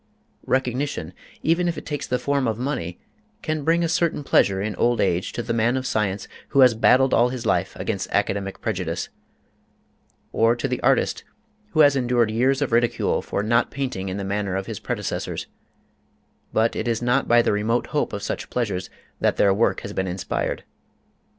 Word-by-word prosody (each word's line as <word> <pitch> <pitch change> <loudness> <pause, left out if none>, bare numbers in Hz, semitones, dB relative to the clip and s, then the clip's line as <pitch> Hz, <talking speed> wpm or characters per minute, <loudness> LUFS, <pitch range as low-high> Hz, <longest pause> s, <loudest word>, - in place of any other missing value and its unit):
Recognition, 130 - -1 0.3
even 170 +2 +2
if 170 - -1
it - - -7
takes 145 -2 -4
the 125 - 0
form 135 +1 0
of 110 -1 -1
money, 120 - -3 0.4
can 155 -1 -2
bring 165 +3 +2
a - - +2
certain 160 -2 0
pleasure 95 -7 +3
in 105 0 -2
old 120 0 +2
age 90 -1 +1
to 120 - -3
the - - -2
man 115 +3 +2
of 130 - -3
science 100 -4 -1 0.2
who 140 - +3
has 125 -2 +7
battled 130 +4 +4
all 120 +2 +4
his 125 -2 -5
life - - 0
against - - -3
academic 100 -1 -1
prejudice, 90 -6 -2 1.2
or 115 +1 +3
to 120 - -2
the 125 -1 -3
artist 135 +1 +2 0.5
who 155 - +5
has 145 -2 +6
endured 120 -4 +2
years 130 +5 +2
of 135 - -3
ridicule 120 +1 +1
for 100 - -3
not 115 +2 +2
painting 125 -9 -3
in 95 - -4
the 100 - -3
manner 100 -1 -2
of 95 0 -2
his - - -6
predecessors; - - -3 1.1
but 115 +1 +2
it 115 - -2
is 115 0 -1
not 125 +3 +2
by 120 0 +5
the - - +2
remote 110 +4 0
hope 150 - 0
of 100 - -5
such - - -4
pleasures 100 -7 -2 0.3
that - - +1
their 100 -1 +4
work 110 +4 +1
has 100 - -7
been 95 -1 -1
inspired. 90 0 -3
120 Hz, 190 wpm, -23 LUFS, 100-135 Hz, 1.2 s, has